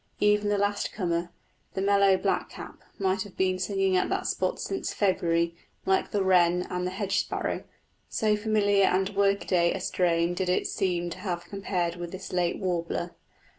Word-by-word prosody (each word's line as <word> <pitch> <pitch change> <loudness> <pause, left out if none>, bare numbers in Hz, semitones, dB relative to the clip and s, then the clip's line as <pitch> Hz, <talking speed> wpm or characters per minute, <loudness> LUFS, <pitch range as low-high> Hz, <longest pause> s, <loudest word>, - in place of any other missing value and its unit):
Even 210 0 +3
the 205 - +2
last 205 0 0
comer, 170 -3 -1 0.5
the - - -1
mellow 200 -1 +4
blackcap, - - -3 0.2
might 190 0 0
have 200 -1 -8
been 185 -1 +1
singing 195 0 +1
at 180 - +2
that - - -1
spot - - -1
since 385 - -3
February, 170 -4 +1 0.3
like 190 0 +2
the 205 -2 0
wren 180 -1 +4
and 180 0 -1
hedge 195 +1 -1
sparrow, - - -2 0.5
so 215 -1 +1
familiar 205 -2 +2
and 190 +1 +2
workaday 195 -3 +2
a - - -3
strain 170 -1 +1
did 180 0 -2
it 180 - +1
seem 175 -3 -1
to 175 - -7
have 175 -3 -3
compared 180 -3 -2
with 175 -1 -6
this 190 0 -8
late 175 -1 +1
warbler. 175 -2 -2
185 Hz, 170 wpm, -27 LUFS, 175-200 Hz, 0.5 s, mellow